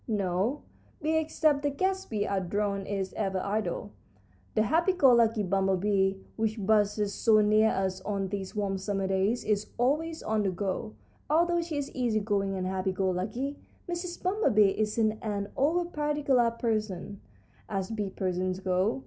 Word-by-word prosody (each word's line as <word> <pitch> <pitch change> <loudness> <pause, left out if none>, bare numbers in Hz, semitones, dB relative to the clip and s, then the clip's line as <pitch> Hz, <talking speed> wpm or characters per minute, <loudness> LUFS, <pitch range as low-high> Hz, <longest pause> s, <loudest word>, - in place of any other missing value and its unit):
"No 205 +4 0 0.4
bee 315 +1 +1
except 310 -2 +1
the 290 - +1
guest 380 +6 -1
bee 210 -2 -1
and 190 -3 -2
drone 200 -1 -1
is 195 -2 -3
ever 195 -3 -1
idle. 205 0 -2 0.6
The 215 - +4
happy 335 - +2
go 275 -8 +5
lucky 225 -2 +3
bumblebee, 195 +1 +1 0.2
which 220 0 0
buzzes 205 -1 +2
so 220 -2 +4
near 215 +1 +4
us 190 -2 -1
on 195 -1 -2
these 195 0 -5
warm 195 -2 -1
summer 195 0 -2
days, 195 +5 +1
is 210 -1 0
always 310 +7 0
on 220 0 0
the 200 - +1
go, 195 +4 -3 0.3
although 345 +3 +3
she 330 -3 -4
is 285 -1 -3
easy 240 -4 0
going 200 -2 0
and 185 -1 -2
happy 190 0 -1
go 190 0 0
lucky. 235 +10 -3 0.3
Mrs. 350 0 -5
Bumblebee 285 - +3
isn't 215 0 +1
an 205 -2 -3
over 330 +6 +2
particular 295 -6 +1
person, 215 -4 -3 0.5
as 195 0 -2
bee 210 -3 -2
persons 185 0 -2
go. 190 +5 0
210 Hz, 160 wpm, -29 LUFS, 195-265 Hz, 0.6 s, go